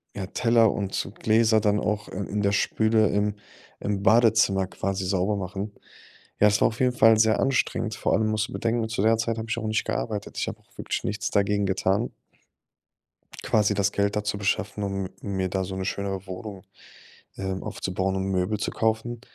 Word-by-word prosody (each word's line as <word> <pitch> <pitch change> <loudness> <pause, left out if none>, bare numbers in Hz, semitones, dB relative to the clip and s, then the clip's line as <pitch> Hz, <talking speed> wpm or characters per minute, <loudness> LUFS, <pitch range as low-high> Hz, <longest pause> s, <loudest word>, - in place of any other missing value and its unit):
ja, 95 -2 -4
Teller 115 0 +3
und 100 -2 -3
so - - -2
Gläser 110 0 +3
dann 105 0 +2
auch, 105 -1 -2
äh, - - -10
in 100 +1 -2
der 100 0 +2
Spüle 110 +1 +2
im 105 0 +1 0.5
im 100 -1 -2
Badezimmer 110 -4 +4
quasi 95 0 -3
sauber 95 +2 +1
machen. 100 +2 -4 0.7
Ja, 105 - +6
das 105 0 +2
war - - +5
auf 110 - -9
jeden 125 -1 +2
Fall 110 -2 +5
sehr 110 0 +4
anstrengend. 115 -4 0
Vor - - 0
allem 110 +2 +2
musst 110 -1 0
du - - -11
bedenken, 115 -1 0
zu 110 -3 -2
der 110 +1 +4
Zeit 115 0 -1
habe 110 0 -5
ich 120 - -1
auch 110 -1 -3
nicht 110 0 0
gearbeitet. 105 -3 -3
Ich - - -1
habe - - -5
auch - - -30
wirklich - - -3
nichts 105 +2 -2
dagegen 100 0 +2
getan 95 +3 0 1.3
quasi 105 -1 +2
das 100 0 +1
Geld 100 0 0
da 105 - -1
zu 105 0 -2
beschaffen, 100 0 -1
um 95 -1 -3
mir 95 -2 -2
da 95 0 -1
so 95 0 -6
'ne 95 - -3
schönere 95 0 -3
Wohnung, 95 +1 -7 0.7
ähm, 95 -1 -3
aufzubauen 95 0 -2
und 95 - -1
Möbel 95 +2 0
zu - - -2
kaufen. 110 +1 -1
105 Hz, 200 wpm, -25 LUFS, 95-110 Hz, 1.3 s, Ja